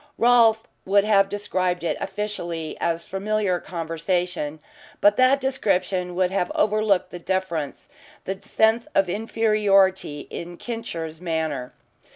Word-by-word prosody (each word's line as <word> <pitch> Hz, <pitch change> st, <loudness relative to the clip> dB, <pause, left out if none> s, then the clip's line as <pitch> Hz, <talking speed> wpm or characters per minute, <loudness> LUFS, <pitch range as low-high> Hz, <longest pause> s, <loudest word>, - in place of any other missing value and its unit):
Rolfe 230 Hz, -2 st, +5 dB, 0.2 s
would 200 Hz, +1 st, +3 dB
have 200 Hz, -2 st, +4 dB
described 185 Hz, -3 st, -1 dB
it 170 Hz, -, 0 dB
officially 190 Hz, -5 st, -4 dB
as 170 Hz, 0 st, -1 dB
familiar 195 Hz, -1 st, -1 dB
conversation, 165 Hz, -2 st, -3 dB, 0.4 s
but 205 Hz, 0 st, +5 dB
that 255 Hz, +2 st, +5 dB
description 185 Hz, -9 st, 0 dB
would 185 Hz, 0 st, +1 dB
have 180 Hz, -2 st, 0 dB
overlooked 215 Hz, -2 st, +2 dB
the 175 Hz, -, -7 dB
deference, 170 Hz, -5 st, -3 dB, 0.4 s
the 190 Hz, 0 st, -4 dB
sense 220 Hz, +3 st, +2 dB
of 195 Hz, -, +4 dB
inferiority, 200 Hz, -6 st, +2 dB
in 175 Hz, 0 st, -7 dB
"Kincher's" 165 Hz, -9 st, -6 dB
manner. 160 Hz, -7 st, -3 dB
190 Hz, 120 wpm, -24 LUFS, 170-215 Hz, 0.4 s, Rolfe